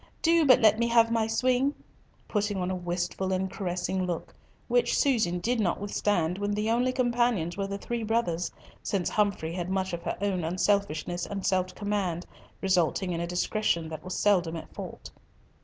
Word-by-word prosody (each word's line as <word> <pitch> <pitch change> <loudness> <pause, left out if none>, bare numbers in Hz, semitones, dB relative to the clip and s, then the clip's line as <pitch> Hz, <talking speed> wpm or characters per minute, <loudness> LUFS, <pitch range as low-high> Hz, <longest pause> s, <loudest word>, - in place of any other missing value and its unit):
Do 330 -2 +4
but 255 -1 +7
let 215 0 +5
me 235 - +2
have 230 -1 +4
my 225 -1 +2
swing!" 255 +4 +1 0.5
putting 205 -1 -1
on 180 0 -1
a - - -1
wistful 180 +1 -2
and 190 0 -1
caressing 185 0 -2
look, 175 -2 -4 0.3
which - - +2
Susan 220 - +2
did 235 +7 0
not 185 -5 +1
withstand 195 -3 0
when 205 0 -1
the 210 +2 0
only 245 +2 +2
companions 240 -9 +1
were 195 0 -2
the 200 0 -4
three 235 +3 -4
brothers, 210 -7 0 0.3
since 190 -4 -1
Humfrey 200 -6 0
had 175 0 -3
much 190 -1 -1
of 170 - -3
her - - -3
own 195 -3 -1
unselfishness 175 -1 0
and 195 -2 -4
self 185 -1 +1
command, 200 -4 -2 0.4
resulting 185 0 +2
in 170 -1 -2
a 170 - -2
discretion 175 -2 0
that 155 -1 -7
was 185 - -4
seldom 180 -5 +2
at 165 - -8
fault. - - -8
195 Hz, 180 wpm, -28 LUFS, 175-225 Hz, 0.5 s, but